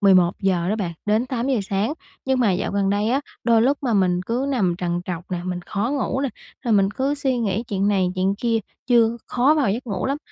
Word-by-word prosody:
11:00 185 Hz, -2 st, +3 dB
đó 215 Hz, -, +1 dB
bạn, 180 Hz, -5 st, -2 dB
đến 220 Hz, +4 st, +2 dB
8:00 255 Hz, 0 st, 0 dB
sáng, 200 Hz, +8 st, +1 dB, 0.3 s
nhưng 265 Hz, -1 st, +1 dB
mà 210 Hz, -6 st, +3 dB
dạo 180 Hz, -, -2 dB
gần 200 Hz, -1 st, +1 dB
đây 205 Hz, +2 st, +1 dB
á, 270 Hz, +3 st, +2 dB, 0.2 s
đôi 230 Hz, -2 st, +4 dB
lúc 275 Hz, +3 st, +2 dB
mà 245 Hz, -4 st, 0 dB
mình 180 Hz, -3 st, +2 dB
cứ 250 Hz, +4 st, -1 dB
nằm 200 Hz, -10 st, +1 dB
trằn 175 Hz, -1 st, -1 dB
trọc 180 Hz, 0 st, -6 dB
nè, 175 Hz, -1 st, -2 dB
mình 180 Hz, -1 st, -3 dB
khó 215 Hz, +5 st, -1 dB
ngủ 275 Hz, -1 st, -1 dB
nè, 275 Hz, -, 0 dB, 0.4 s
rồi 235 Hz, -, +1 dB
mình 195 Hz, -1 st, +4 dB
cứ 270 Hz, +6 st, -1 dB
suy 265 Hz, -3 st, 0 dB
nghĩ 215 Hz, -1 st, 0 dB
chuyện 200 Hz, -1 st, +1 dB
này, 190 Hz, -3 st, +2 dB
chuyện 190 Hz, +1 st, +1 dB
kia, 230 Hz, +1 st, 0 dB, 0.3 s
chưa 235 Hz, -2 st, +4 dB
khó 265 Hz, +5 st, +3 dB
vào 275 Hz, -10 st, +2 dB
giấc 240 Hz, +5 st, -3 dB
ngủ 200 Hz, +1 st, -2 dB
lắm, 280 Hz, +2 st, -1 dB
215 Hz, 235 wpm, -22 LUFS, 190-255 Hz, 0.4 s, đôi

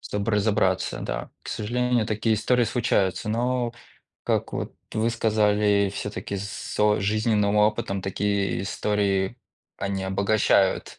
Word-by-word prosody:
чтоб 105 Hz, -1 st, -4 dB
разобраться, 105 Hz, -3 st, +1 dB
да. 65 Hz, -1 st, -4 dB
К -, -, -10 dB
сожалению, 120 Hz, +1 st, 0 dB
такие 110 Hz, +1 st, +1 dB
истории 125 Hz, +3 st, +2 dB
случаются, 110 Hz, -5 st, 0 dB
но 120 Hz, +1 st, 0 dB, 0.5 s
как -, -, 0 dB
вот -, -, -4 dB, 0.2 s
вы 110 Hz, +2 st, +1 dB
сказали, 105 Hz, -3 st, +2 dB
всё-таки 100 Hz, 0 st, -4 dB
с 100 Hz, +1 st, -5 dB
о 105 Hz, 0 st, +4 dB
жизненным 105 Hz, 0 st, +1 dB
опытом 105 Hz, -2 st, +1 dB
такие 100 Hz, 0 st, -1 dB
истории 100 Hz, +1 st, 0 dB, 0.4 s
они 100 Hz, -1 st, -3 dB
обогащают 95 Hz, 0 st, +1 dB
105 Hz, 120 wpm, -25 LUFS, 100-110 Hz, 0.5 s, о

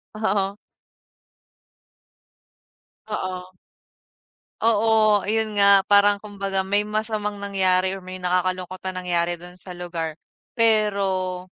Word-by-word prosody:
Oo. 200 Hz, -2 st, -1 dB, 2.5 s
Oo. 185 Hz, -3 st, -5 dB, 1.1 s
Oo. 220 Hz, -2 st, +3 dB
Ayun 215 Hz, 0 st, -1 dB
nga. 200 Hz, -1 st, +7 dB
Parang 205 Hz, 0 st, +5 dB
kumbaga 195 Hz, -2 st, -3 dB
may 205 Hz, +2 st, 0 dB
masamang 210 Hz, -1 st, -3 dB
nangyari 190 Hz, -1 st, +1 dB
or -, -, -11 dB
may 185 Hz, 0 st, -8 dB
nakakalungkot 180 Hz, 0 st, -1 dB
na 185 Hz, -, -2 dB
nangyari 175 Hz, -1 st, 0 dB
dun 175 Hz, +1 st, -11 dB
sa 180 Hz, 0 st, -10 dB
lugar, 170 Hz, -3 st, -5 dB, 0.4 s
pero 195 Hz, -5 st, +1 dB
195 Hz, 100 wpm, -23 LUFS, 185-210 Hz, 2.5 s, nga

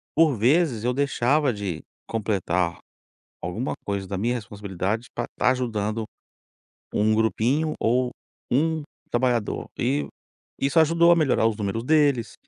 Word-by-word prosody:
por 160 Hz, -3 st, +5 dB
vezes, 130 Hz, 0 st, +2 dB
eu 125 Hz, +1 st, +1 dB
deixava 140 Hz, 0 st, +2 dB
de 95 Hz, -6 st, -4 dB, 0.3 s
completar 95 Hz, -5 st, -1 dB, 0.6 s
alguma 105 Hz, +10 st, -2 dB
coisa 100 Hz, -1 st, -2 dB
da 95 Hz, -, -3 dB
minha 120 Hz, +6 st, 0 dB
responsabilidade 100 Hz, 0 st, -3 dB
pra 120 Hz, -, -2 dB
estar 125 Hz, -, +1 dB
ajudando 110 Hz, -3 st, -2 dB, 0.9 s
um 110 Hz, +1 st, +3 dB
grupinho 125 Hz, +8 st, +1 dB
ou 125 Hz, +2 st, +1 dB, 0.4 s
um 160 Hz, +4 st, +1 dB, 0.3 s
trabalhador. 120 Hz, -3 st, 0 dB
E 70 Hz, +1 st, 0 dB, 0.5 s
isso 140 Hz, +4 st, +2 dB
ajudou 170 Hz, +2 st, +5 dB
a 170 Hz, -, +7 dB
melhorar 135 Hz, -8 st, +3 dB
os 110 Hz, -2 st, -1 dB
números 105 Hz, +2 st, -2 dB
deles 145 Hz, -4 st, +2 dB
120 Hz, 130 wpm, -24 LUFS, 105-140 Hz, 0.9 s, a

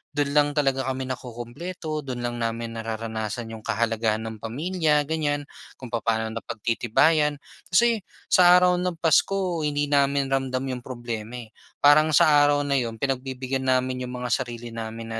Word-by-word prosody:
do'n 145 Hz, -1 st, 0 dB
lang 145 Hz, 0 st, +4 dB
talaga 135 Hz, -3 st, +1 dB
kami 130 Hz, 0 st, -2 dB
nakukumpleto. 130 Hz, +7 st, -6 dB
Do'n 125 Hz, -4 st, -5 dB
lang 120 Hz, 0 st, -3 dB
namin 115 Hz, 0 st, -3 dB
nararanasan 115 Hz, 0 st, -4 dB
yung 110 Hz, -, -7 dB
kahalagahan 110 Hz, 0 st, -1 dB
ng 110 Hz, -1 st, -6 dB
pamilya, 150 Hz, -, 0 dB
ganyan. 145 Hz, -1 st, -1 dB, 0.3 s
Kung 125 Hz, -3 st, -10 dB
papaano 110 Hz, -1 st, -1 dB
napagtitibayan. 145 Hz, +8 st, +1 dB, 0.3 s
Kasi 230 Hz, +5 st, +3 dB, 0.3 s
sa 180 Hz, -1 st, +7 dB
araw 180 Hz, 0 st, +4 dB
ng 180 Hz, -1 st, -1 dB
Pasko 180 Hz, +2 st, +2 dB
hindi 145 Hz, -1 st, -1 dB
namin 140 Hz, -1 st, +2 dB
ramdam 130 Hz, -1 st, 0 dB
yung 125 Hz, -, -4 dB
problema, 120 Hz, -2 st, -6 dB
eh. 115 Hz, -3 st, -9 dB, 0.3 s
Parang 155 Hz, +1 st, +6 dB
sa 155 Hz, -, +6 dB, 0.2 s
araw 145 Hz, 0 st, +2 dB
na 140 Hz, -1 st, +1 dB
'yon 115 Hz, -2 st, -3 dB
pinagbibigyan 130 Hz, +1 st, -3 dB
namin 130 Hz, 0 st, 0 dB
'yong 125 Hz, -, -6 dB
mga 125 Hz, -, -3 dB
sarili 120 Hz, 0 st, -3 dB
namin 115 Hz, 0 st, -6 dB
130 Hz, 155 wpm, -25 LUFS, 115-150 Hz, 0.3 s, sa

